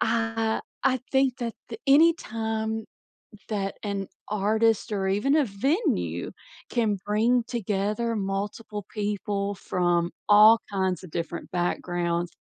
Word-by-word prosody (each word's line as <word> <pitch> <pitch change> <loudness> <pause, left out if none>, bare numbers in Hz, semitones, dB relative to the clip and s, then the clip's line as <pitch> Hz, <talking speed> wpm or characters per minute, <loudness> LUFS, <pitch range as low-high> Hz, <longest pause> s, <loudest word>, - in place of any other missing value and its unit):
I 225 -1 0 0.2
I 260 -1 +3
think 265 -2 +3
that 235 -2 -3
the - - -7
anytime 225 -8 +2 0.7
that 195 -2 -2
an 200 -2 -3 0.2
artist 215 +2 +1
or 195 -2 0
even 210 +10 +2
a 290 - +3
venue 270 - -1 0.4
can 220 -4 +1
bring 230 +4 +2
together 215 0 -1
multiple 205 +1 -3
people 205 -1 -2
from 175 -1 0 0.2
all 215 +2 +8
kinds 190 -3 -1
of 180 - -11
different 170 0 -4
backgrounds, 175 -1 -1
210 Hz, 115 wpm, -26 LUFS, 195-230 Hz, 0.7 s, all